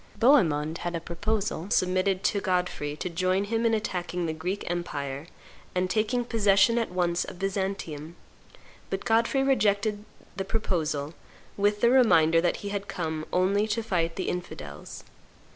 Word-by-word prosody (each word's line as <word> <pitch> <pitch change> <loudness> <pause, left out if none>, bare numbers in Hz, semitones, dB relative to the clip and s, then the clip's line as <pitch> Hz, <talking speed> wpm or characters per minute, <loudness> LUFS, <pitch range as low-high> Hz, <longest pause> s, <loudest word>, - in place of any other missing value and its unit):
Bohemond 165 - +3
had 175 0 -3
a - - -1
proposal 195 +1 -2
submitted 185 0 +1
to 205 -1 +1
Godfrey 180 -6 -1
to 155 - -4
join 185 +3 +1
him 225 +3 0
in 225 - +3
attacking 180 -4 -2
the 160 - -1
Greek 180 +5 -3
empire 145 -4 -4 0.5
and 185 0 0
taking 230 +3 +1
possession 220 0 +4
at 230 - -1
once 175 -1 0
of - - -9
Byzantium; 190 -5 -3 0.7
but - - -3
Godfrey 235 +4 +2
rejected 210 -5 +1 0.3
the 195 - -2
proposal, 160 -8 -1 0.4
with 205 +1 +1
the 235 - +5
reminder 165 -11 +5
that 175 - +1
he - - -2
had 200 0 -4
come 160 -5 -3
only 200 +3 +2
to 225 +2 -1
fight 170 -6 0
the 190 - -3
infidels. 75 - -6
185 Hz, 150 wpm, -27 LUFS, 170-210 Hz, 0.7 s, the